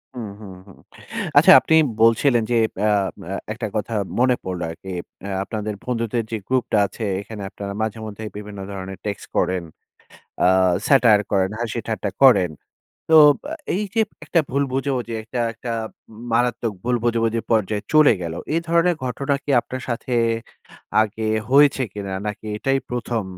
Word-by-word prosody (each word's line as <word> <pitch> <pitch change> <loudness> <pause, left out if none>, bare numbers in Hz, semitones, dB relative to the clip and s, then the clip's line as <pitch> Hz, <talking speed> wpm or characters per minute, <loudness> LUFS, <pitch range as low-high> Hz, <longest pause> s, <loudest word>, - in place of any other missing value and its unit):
হুম, 115 -4 -5
হুম, 100 -3 -9
হুম। 95 - -15 0.6
আচ্ছা - - +8
আপনি 160 - +2 0.3
বলছিলেন 115 +1 +4
যে - - +3 0.3
আ - - +3 0.4
আ - - -2 0.2
একটা 110 0 -4
কথা 110 +2 -2 0.3
মনে 125 0 +4
পড়লো 90 -1 -4
আরকি। 85 +4 -9 0.4
আ - - -4 0.2
আপনাদের 105 0 -4
বন্ধুদের 115 -1 -1
যে 115 - -1
গ্রুপটা 130 -4 +1
আছে, 110 - -7 0.2
এইখানে 105 +1 -8
আপনারা 100 0 -6
মাঝেমধ্যেই 110 -1 -4
বিভিন্ন 105 -1 -8
ধরনের 95 -1 -6
টেক্সট 100 -2 -4
করেন, 90 -1 +1 0.8
আ - - +6 0.4
satire 115 -7 +5
করেন, 95 -1 +2
হাসি-ঠাট্টা 110 -2 -3
করেন। 100 -10 +6 0.6
তো - - +6 0.3
অ্যা 300 +3 -4 0.2
এই 200 - 0
যে 225 - +3 0.2
একটা 170 - +2
ভুল 140 +2 +1
বোঝাবুঝি, 130 -3 -2
একটা 120 +2 -4
একটা 115 +2 -7 0.4
উম 110 0 -13
মারাত্মক 120 -1 +1
ভুল 125 0 +1
বোঝাবুঝি 115 -1 +1
পর্যায়ে 105 -2 +1
চলে 155 -3 +7
গেল। 85 -1 -4 0.2
এ - - +2
ধরনের 170 +1 +3
ঘটনা 135 +3 -1
কি - - -4
আপনার 130 +1 -7
সাথে 120 +1 -3 0.9
আগে 110 +1 -4 0.3
হয়েছে 140 0 +5
কিনা? 100 -2 -5
নাকি 105 +1 -5
এটাই 135 +5 +1
প্রথম? 120 -3 -2
115 Hz, 155 wpm, -22 LUFS, 105-125 Hz, 0.9 s, আচ্ছা